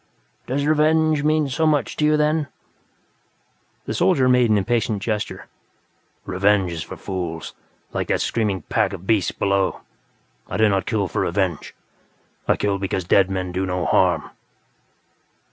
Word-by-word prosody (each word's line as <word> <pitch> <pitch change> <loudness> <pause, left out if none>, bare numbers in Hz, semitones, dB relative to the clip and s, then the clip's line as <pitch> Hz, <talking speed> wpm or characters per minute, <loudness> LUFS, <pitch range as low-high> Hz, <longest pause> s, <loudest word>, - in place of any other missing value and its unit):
"Does 140 +3 -1
revenge 155 0 +3
mean 155 -1 +2
so 150 +4 0
much 150 -2 +1
to 150 - +2
you, 150 0 +3
then?" 150 0 +1 1.4
The - - -3
soldier 130 -1 +3
made 125 -2 +4
an 105 - +4
impatient 110 +1 0
gesture. 105 -1 -3 0.8
"Revenge 95 0 +2
is 80 -1 -4
for - - -8
fools, 85 -4 -5 0.4
like - - -2
that - - +1
pack - - +3
of - - -2
screaming 100 -7 -1 0.4
beasts 105 -3 +2
below. 100 -1 0 0.7
I - - -3
do 110 -1 +4
not 95 -1 0
kill 105 -4 0
for - - -2
revenge; 90 -3 -2 0.7
I - - +4
kill 100 -1 -1
because 95 -1 -2
dead 95 +2 +3
men 95 -1 -3
do 95 +2 -2
no 90 -1 -2
harm." 85 -2 +2
105 Hz, 150 wpm, -22 LUFS, 95-140 Hz, 1.4 s, made